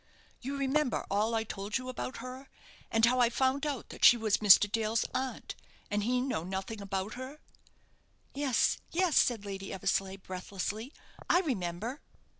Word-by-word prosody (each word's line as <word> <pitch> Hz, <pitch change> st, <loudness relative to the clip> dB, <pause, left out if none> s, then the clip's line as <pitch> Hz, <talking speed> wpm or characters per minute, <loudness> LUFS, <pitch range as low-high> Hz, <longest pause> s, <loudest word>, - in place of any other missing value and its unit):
You 275 Hz, +3 st, -4 dB
remember 275 Hz, -1 st, 0 dB
all 215 Hz, +3 st, +1 dB
I 220 Hz, -, +1 dB
told 205 Hz, 0 st, -3 dB
you 255 Hz, 0 st, -7 dB
about 255 Hz, 0 st, -5 dB
her, 255 Hz, +2 st, -8 dB, 0.4 s
and 225 Hz, 0 st, +4 dB
how 250 Hz, +2 st, +2 dB
I 240 Hz, -1 st, +5 dB
found 265 Hz, +4 st, +1 dB
out 280 Hz, -5 st, -4 dB
that -, -, -9 dB
she 240 Hz, -, +9 dB
was 220 Hz, -2 st, +1 dB
Mr. 205 Hz, -1 st, +7 dB
Dale's 220 Hz, +1 st, 0 dB
aunt, 260 Hz, 0 st, -3 dB, 0.4 s
and 205 Hz, 0 st, +1 dB
he 250 Hz, +3 st, +1 dB
know 250 Hz, -10 st, -2 dB
nothing 190 Hz, +4 st, -5 dB
about 195 Hz, +1 st, -3 dB
her?" 260 Hz, +4 st, -7 dB, 1.0 s
"Yes, 275 Hz, -3 st, +1 dB
yes," 355 Hz, -2 st, +1 dB
said 225 Hz, -5 st, +3 dB
Lady 195 Hz, -1 st, -6 dB
Eversleigh, 190 Hz, +1 st, -1 dB
breathlessly, 195 Hz, +5 st, -5 dB, 0.4 s
"I 355 Hz, -, +5 dB
remember." 225 Hz, -, -3 dB
230 Hz, 160 wpm, -31 LUFS, 200-260 Hz, 1.0 s, she